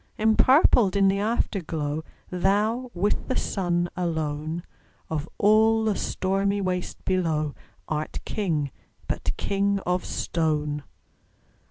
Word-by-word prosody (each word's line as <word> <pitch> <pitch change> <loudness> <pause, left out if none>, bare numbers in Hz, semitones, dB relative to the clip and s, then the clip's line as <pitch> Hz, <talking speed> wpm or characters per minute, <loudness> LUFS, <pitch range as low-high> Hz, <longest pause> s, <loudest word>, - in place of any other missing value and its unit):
Empurpled 220 - +5
in 195 -1 +4
the 195 +1 +1
Afterglow, 165 -8 -1 0.3
Thou, 210 +7 +1
with 200 +4 0
the 260 - -1
Sun 175 -3 0
alone, 160 -1 -2 0.5
Of 155 0 -2
all 220 +2 +4
the 215 -2 +1
stormy 195 +2 0
waste 185 -2 -3
below, 160 -6 0 0.3
Art 155 0 -3
King, 160 -10 -1 0.4
but - - -2
king 200 0 +1
of 180 0 0
stone! 150 -3 -1
185 Hz, 110 wpm, -26 LUFS, 160-205 Hz, 0.5 s, Empurpled